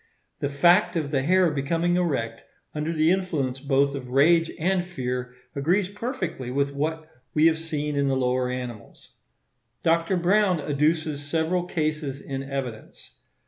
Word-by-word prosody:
The 140 - -1
fact 175 +7 +4
of 150 -4 -1
the 135 -3 +1
hair 180 +3 +3
becoming 165 +5 0
erect 130 -11 -1 0.3
under 150 +2 -2
the 160 0 +3
influence 155 -9 -1
both 140 0 +2
of 130 -3 -6
rage 165 +5 +4
and 180 +2 +1
fear 125 -7 -4 0.2
agrees 180 +7 +1
perfectly 200 - -4
with 140 +2 0
what 155 +2 -2 0.3
we 155 +1 +4
have 160 -1 +4
seen 150 -2 -3
in 140 0 +1
the 135 -1 +1
lower 125 0 +1
animals. 125 -4 -7 0.7
Dr. 165 +2 +2
Browne 185 0 +3
adduces 150 +1 0
several 165 +4 0
cases 155 -5 -2
in 135 -1 -5
evidence. 135 -5 -7
150 Hz, 145 wpm, -25 LUFS, 135-170 Hz, 0.7 s, fact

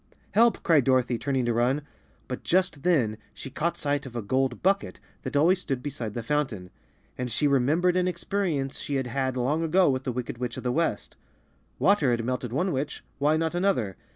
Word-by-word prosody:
"Help!" 235 +1 +3
cried 160 -6 +4
Dorothy, 125 -2 +2
turning 135 -3 0
to 120 - +1
run. 125 +5 +1 0.4
But 125 - -5
just 180 -5 +1
then 135 -11 +2 0.2
she 135 - -8
caught 170 +6 -1
sight 145 -1 -1
of 120 - -11
a 120 - -3
gold 130 +3 0
bucket 195 +2 +1 0.2
that - - -6
always 175 +6 +4
stood 135 -7 -3
beside 125 -7 -5
the 120 - -3
fountain, 115 -9 -2 0.5
and 125 0 -2
she 150 - 0
remembered 150 +7 +2
an 180 0 +2
experience 170 -6 -2
she 145 - -3
had 135 -1 0
had 130 +1 -2
long 140 +6 +1
ago 165 0 +3
with 130 0 -2
the 130 - -2
wicked 120 -1 -5
witch 125 -2 -3
of - - -6
the 125 - 0
West. 155 -7 -1 0.6
Water 190 -9 +3
had 115 -1 0
melted 125 -1 -2
one 180 +9 0
witch— 135 +2 -3 0.2
why 150 +2 +3
not 160 +1 -1
another? 175 - 0
135 Hz, 200 wpm, -27 LUFS, 125-165 Hz, 0.6 s, cried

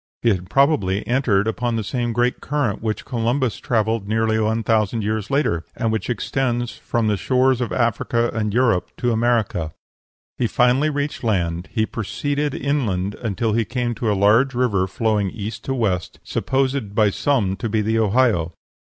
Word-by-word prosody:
He 120 - +4
had 90 -4 -1
probably 135 -9 +2
entered 120 -6 +2
upon 120 +1 -1
the 110 - -1
same 120 +3 -2
great 120 +2 0
current 140 -8 -1
which 110 -1 -3
Columbus 120 -3 0
travelled 110 -2 0
nearly 110 +1 +1
one 110 +1 0
thousand 110 0 +1
years 105 -1 -2
later, 135 - +1
and 115 -3 -1
which 110 +2 -2
extends 120 -1 -1
from 120 -1 -2
the 105 -1 +2
shores 130 +3 +2
of 120 - -2
Africa 115 0 0
and 110 -2 -1
Europe 115 -5 +2
to 120 - 0
America. 110 -9 0 0.7
He 120 - +2
finally 125 +6 +3
reached 145 -1 -3
land; 90 -5 -1
he 110 - +1
proceeded 145 +7 -2
inland 110 -10 -1
until 110 0 -2
he 115 +1 +2
came 120 +1 -2
to 115 -1 -1
a 100 - 0
large 115 +7 +4
river 105 -7 +1
flowing 105 -1 0
from 110 - -12
east 105 +2 -5
to 135 - -1
west, 95 -8 -1
supposed 130 -6 -1
by 105 -2 +4
some 105 -7 +1
to 115 - -3
be 110 0 +1
the 110 +2 +1
Ohio. 105 -6 +2
115 Hz, 175 wpm, -21 LUFS, 105-125 Hz, 0.7 s, He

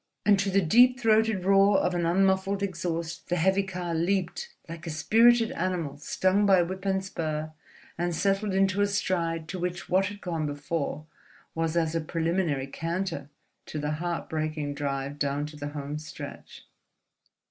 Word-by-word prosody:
And 205 -2 +5
to 200 0 +1
the 195 0 +3
deep 245 +9 +5
throated 220 -4 +2
roar 195 +1 +5
of 180 - +1
an 170 -1 0
unmuffled 195 +2 +2
exhaust, 170 -3 -3
the 175 - +1
heavy 190 +3 +3
car 180 -3 -4
leaped, 175 +2 -1 0.2
like 165 0 -8
a - - -2
spirited 225 +9 +4
animal 170 -5 -2
stung 190 +7 +1
by 190 -3 +6
whip 190 +3 -6
and 190 0 0
spur, 155 -4 -3 0.5
and 175 -1 0
settled 195 +2 0
into 195 +1 +2
a 205 - +4
stride 170 -5 -1
to 185 - -4
which 180 0 -4
what 190 +1 +3
had 205 0 -7
gone 165 -5 -2
before 145 +1 -3 0.5
was 165 0 -1
as 160 -1 +1
a 165 - 0
preliminary 165 -3 -1
canter 165 0 -3 0.4
to - - -5
the 150 0 -2
heartbreaking 155 -2 -3
drive 140 0 -3
down 145 +1 0
to 150 0 -9
the 145 -1 -5
home 145 0 -5
stretch. 155 - -9
175 Hz, 165 wpm, -27 LUFS, 155-195 Hz, 0.5 s, by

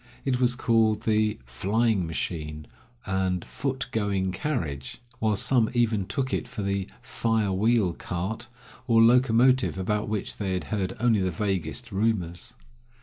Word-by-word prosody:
It 130 -2 +1
was 125 -1 +3
called 110 -3 +2
the 110 -1 +2
"flying 100 - +1
machine" 75 -2 -4 0.4
and 95 -2 -1
"foot 130 +1 -3
going 100 -5 0
carriage," 90 - -3 0.2
while 110 -1 +2
some 115 +2 +2
even 110 -5 +1
took 135 -1 -2
it - - -1
for 105 - -5
the 100 -1 -1 0.2
"fire 110 -3 0
wheel 105 -2 +2
cart," 90 +6 -4 0.4
or 115 -2 +5
locomotive, 125 0 +4
about 105 +3 -1
which 105 -2 -3
they 95 -3 -1
had 90 - -1
heard 95 -2 -1
only 120 -3 +3
the 95 - +1
vaguest 100 +6 -2
rumors. 95 -4 -1
105 Hz, 145 wpm, -26 LUFS, 95-115 Hz, 0.4 s, or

